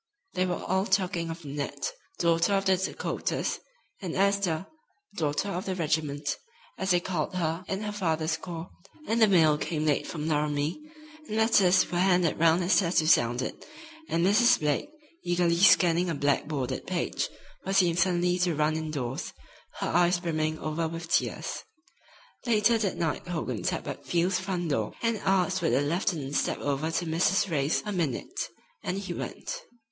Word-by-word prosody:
They 185 0 +1
were 180 - 0
all 190 +2 0
talking 180 -3 0
of 165 -1 -7
Nanette, 145 - -3 0.3
Daughter 170 +4 +2
of 195 0 0
the 190 -1 +4
Dakotas, 190 +1 -2 0.4
and 180 -4 -4
Esther, 195 -3 +1 0.5
Daughter 155 +5 -1
of 185 -1 -4
the 190 - -1
Regiment, 155 -3 -1 0.4
as 190 - -1
they 175 -2 +4
called 175 -1 -3
her 165 0 -1
in 195 +1 -2
her 210 -1 -3
father's 160 -5 0
Corps, 170 0 -7 0.4
and 225 +1 +1
the 220 - +8
mail 160 -6 +4
came 155 -1 -2
late 150 -2 +1
from 155 -2 -4
Laramie, 150 - 0 0.5
and 215 - -3
letters 195 -6 +4
were 175 - 0
handed 180 -4 +3
round 165 +2 +4
as 180 +4 +4
tattoo 170 -4 +2
sounded, 120 -5 +2 0.5
and 170 +1 +1
Mrs. 225 +5 +5
Blake, 150 - 0 0.3
eagerly 175 -1 +2
scanning 175 -2 +5
a 165 - -1
black 145 0 +1
bordered 140 -5 -3
page, - - -1 0.3
was 195 +1 0
seen 175 -3 +4
suddenly 180 0 +2
to 175 -2 +1
run 155 +1 +1
in 160 0 -3
doors, 130 -4 -4 0.5
her - - 0
eyes 175 +1 +3
brimming 155 -2 -1
over 155 +1 -2
with 165 +1 -7
tears. - - 0 0.9
Later 225 0 +4
that 200 -4 -1
night 165 +1 -2
Hogan 155 -10 -3
tapped - - -2
at - - -6
Field's 180 +2 +1
front 180 -4 -2
door 110 -6 -1
and 230 -1 +1
asked 185 -1 +1
would 165 - +1
the 130 - +3
lieutenant 155 -2 -1
step - - +1
over 145 +2 -1
to 170 +2 -1
Mrs. 175 +4 +1
Ray's 145 0 +1
a 210 - -3
minute, 180 - -2 0.3
and 180 - -2
he 200 0 -4
went. - - -5
175 Hz, 170 wpm, -28 LUFS, 155-190 Hz, 0.9 s, the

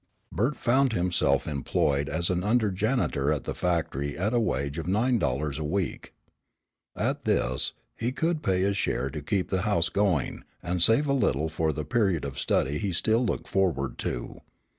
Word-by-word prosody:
Bert 120 +8 0
found 130 0 +2
himself 90 -2 +1
employed 70 0 0
as 85 +4 0
an 90 0 0
under 110 0 +2
janitor 95 - 0
at 75 -4 -1
the - - -3
factory 80 -5 -1
at 100 +6 0
a 120 - +3
wage 70 - -1
of 80 - -5
nine 115 +6 +2
dollars 70 0 -1
a - - -2
week. 90 +4 -2 0.8
At - - -2
this, 65 +1 +1 0.2
he 120 +2 -2
could 160 +3 -1
pay 95 -6 +1
his 100 +1 +1
share 65 -6 -1
to 75 - -5
keep 95 +5 -1
the 95 -1 0
house 85 -5 +2
going, 95 -8 0 0.2
and 90 0 -1
save 115 - +4
a 140 - +1
little 80 - +1
for 80 0 0
the 75 0 -4
period 100 - +1
of 70 -1 -5
study 70 +3 +1
he 100 -3 -2
still 110 +7 +2
looked 120 - -2
forward 85 -9 0
to. - - -4
90 Hz, 185 wpm, -27 LUFS, 75-110 Hz, 0.8 s, save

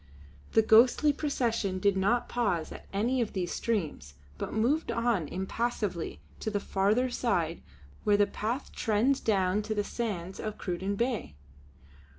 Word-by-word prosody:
The 225 - +5
ghostly 245 +7 +6
procession 230 -10 -1
did 200 +1 +2
not 205 +6 +2
pause 200 -10 -1
at - - -10
any 240 +6 +1
of 225 - -2
these 180 -3 -2
streams, 155 - -2 0.2
but - - -3
moved 255 +9 +1
on 230 -9 +1
impassively 190 - -2 0.2
to - - -2
the 205 -1 -1
farther 210 +7 +1
side 170 -10 0 0.4
where 205 -1 +4
the 205 - +5
path 235 +7 -3
trends 230 +5 +1
down 195 -1 +1
to 215 +1 -3
the 205 - +1
sands 195 -5 -4
of 215 -1 -4
Cruden 190 +2 -2
Bay. 235 - -2
215 Hz, 150 wpm, -29 LUFS, 190-235 Hz, 0.4 s, ghostly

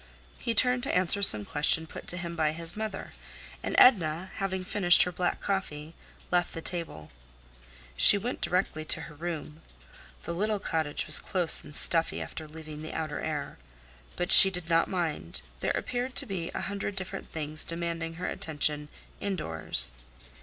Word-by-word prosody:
He 230 -2 -3
turned 250 0 +3
to 270 - -1
answer 185 +2 +2
some 105 - +9
question 150 +5 +1
put - - -11
to 175 - -3
him 170 -1 -6
by 155 -2 0
his 165 +1 -4
mother, 215 -2 -6 0.5
and - - -4
Edna, 185 -6 +3
having 190 -1 -3
finished 185 -2 +5
her 180 - -4
black 180 0 -3
coffee, 160 -6 -4 0.4
left 175 0 -1
the - - -5
table. 165 - -4 0.8
She 70 - +7
went 240 +6 -5
directly 180 -4 -2
to 155 - 0
her - - -11
room. 160 0 -7 0.6
The 170 - -5
little 210 +4 -2
cottage 160 -6 -3
was 155 - +5
close 180 -5 +4
and 150 - -8
stuffy 165 0 +2
after 155 - -8
leaving 155 -1 -11
the 155 - -8
outer 155 -2 -4
air. - - -6 0.6
But 175 - -4
she 195 - +10
did 180 -2 -7
not 165 0 +2
mind; 160 - -5 0.2
there - - -2
appeared 250 +1 -5
to 280 - -1
be 185 -7 -5
a - - -3
hundred 200 0 -5
different 190 -2 -7
things 155 0 -3
demanding 165 -1 -5
her 180 +2 -6
attention 150 -1 -2 0.3
indoors. 80 - -1
170 Hz, 165 wpm, -27 LUFS, 155-190 Hz, 0.8 s, she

